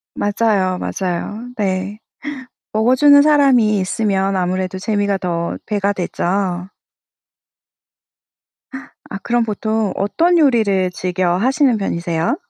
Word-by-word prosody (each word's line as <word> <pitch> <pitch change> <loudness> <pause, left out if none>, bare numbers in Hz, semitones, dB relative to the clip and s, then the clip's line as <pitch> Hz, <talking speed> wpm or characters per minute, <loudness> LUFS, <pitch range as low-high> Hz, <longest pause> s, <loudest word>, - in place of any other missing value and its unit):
맞아요, 205 -3 0
맞아요. 200 +7 -4
네. 195 0 -2 0.8
먹어주는 260 +6 +5
사람이 265 -8 +4
있으면 195 0 -1
아무래도 185 +1 -2
재미가 200 0 -1
더 170 -3 -3
배가 205 -2 0
되죠. 180 0 -2 2.4
아, 195 - -5
그럼 240 0 +1
보통 215 -1 -2
어떤 335 - +1
요리를 215 - +2
즐겨 180 0 -1
하시는 260 +2 +2
편이세요? 170 - -1
200 Hz, 230 characters per minute, -18 LUFS, 185-225 Hz, 2.4 s, 먹어주는